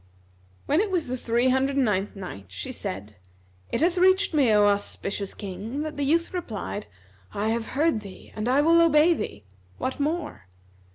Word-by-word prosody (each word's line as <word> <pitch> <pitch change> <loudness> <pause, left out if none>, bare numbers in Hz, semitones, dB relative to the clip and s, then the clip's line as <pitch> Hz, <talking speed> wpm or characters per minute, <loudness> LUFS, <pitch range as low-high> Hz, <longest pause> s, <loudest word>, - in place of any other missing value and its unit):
When 295 - +2
it 425 - -1
was 360 -4 0
the 255 - -3
Three 240 +1 +1
Hundred 265 +2 +1
and 275 -2 +3
Ninth 205 -1 -1
Night, 180 - -8
She - - -6
said, 100 +2 -6 0.5
It - - 0
hath 350 +2 +2
reached 375 0 +4
me, 275 -7 +4
O 210 -1 +5
auspicious 200 -1 -1
King, 210 +9 -5
that 310 0 -5
the 285 - -4
youth 335 +6 +1
replied, 220 - -4 0.5
"I 210 +2 0
have 225 0 -1
heard 305 -7 +2
thee 195 -2 -12
and 215 +3 -2
I 270 +3 +4
will 335 +2 +5
obey 330 +1 +5
thee; 105 - -5 0.3
what 260 - -3
more?" 300 - -3
260 Hz, 180 wpm, -26 LUFS, 205-315 Hz, 0.5 s, O